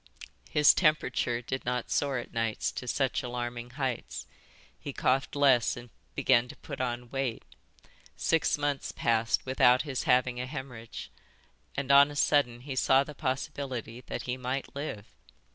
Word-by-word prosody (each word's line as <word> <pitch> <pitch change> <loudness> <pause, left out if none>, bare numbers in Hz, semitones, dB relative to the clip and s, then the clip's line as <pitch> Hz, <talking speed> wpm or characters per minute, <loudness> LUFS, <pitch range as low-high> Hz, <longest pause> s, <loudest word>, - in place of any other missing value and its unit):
His 150 0 +6
temperature 155 -7 +1
did 130 +2 -3
not 125 0 -2
soar 140 -2 +1
at 120 - -6
night 115 -2 -1 0.2
to 125 - -5
such 135 +1 0
alarming 120 -1 -4
heights, 130 -4 -3 0.5
he 140 - -6
coughed 135 +3 +1
less 135 -6 +4
and 120 -1 -10 0.2
began 125 -2 +3
to - - -10
put - - -7
on 120 -1 -3
weight; 135 -4 -2 0.7
six 165 -2 +2
months 145 -1 -1
passed 115 0 +1
without 130 -1 +4
his 140 -4 -3
having 125 -1 +2
a 125 - -4
hÊmorrhage; 125 - -7 0.7
and 140 -1 0
on 140 +1 +8
a 145 - -8
sudden 140 -5 +2
he 135 0 -6
saw 135 +1 +4
the 150 - -9
possibility 130 -3 -4
that - - -4
he 125 0 -3
might 130 +2 -4
live. 140 -8 -5
130 Hz, 155 wpm, -29 LUFS, 120-140 Hz, 0.7 s, on